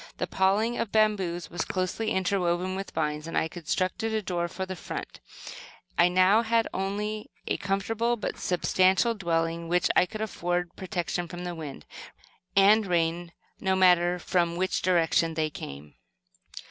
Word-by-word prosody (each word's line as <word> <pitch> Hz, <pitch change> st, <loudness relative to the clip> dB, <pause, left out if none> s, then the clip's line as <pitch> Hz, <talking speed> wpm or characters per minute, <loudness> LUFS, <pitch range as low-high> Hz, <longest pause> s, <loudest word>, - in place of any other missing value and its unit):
The -, -, -1 dB
paling 205 Hz, +5 st, +1 dB
of 210 Hz, -, -2 dB
bamboos 195 Hz, -6 st, +1 dB
was 175 Hz, -, -2 dB
closely 185 Hz, +4 st, -2 dB
interwoven 185 Hz, -2 st, 0 dB
with 195 Hz, +1 st, -5 dB
vines, 150 Hz, 0 st, -2 dB
and 165 Hz, -, -3 dB
I -, -, +2 dB
constructed 185 Hz, +6 st, -2 dB
a 215 Hz, -, 0 dB
door 175 Hz, -2 st, -1 dB
for 190 Hz, +2 st, -5 dB
the 185 Hz, 0 st, -5 dB
front. -, -, -7 dB, 0.8 s
I 175 Hz, -, +5 dB
now 185 Hz, +4 st, +4 dB
had 230 Hz, 0 st, +1 dB
not 190 Hz, -, -2 dB
only 210 Hz, +2 st, -3 dB, 0.2 s
a -, -, -1 dB
comfortable 225 Hz, +5 st, 0 dB
but 215 Hz, -, -3 dB
a -, -, -16 dB
substantial 185 Hz, +5 st, +2 dB
dwelling, 165 Hz, -4 st, -1 dB
which 180 Hz, +1 st, +2 dB
would 180 Hz, +4 st, +2 dB
afford 175 Hz, -4 st, -2 dB
protection 175 Hz, -2 st, -3 dB
from 175 Hz, 0 st, -7 dB
the 175 Hz, -1 st, -4 dB
wind 150 Hz, -, -8 dB, 0.7 s
and 205 Hz, +2 st, +5 dB
rain, 170 Hz, 0 st, 0 dB, 0.3 s
no 190 Hz, -1 st, +1 dB
matter 180 Hz, -1 st, +4 dB
from 170 Hz, -1 st, 0 dB
which 185 Hz, +2 st, 0 dB
direction 165 Hz, -2 st, +2 dB
they 155 Hz, -1 st, 0 dB
came. 70 Hz, -, -9 dB
180 Hz, 160 wpm, -27 LUFS, 170-195 Hz, 0.8 s, I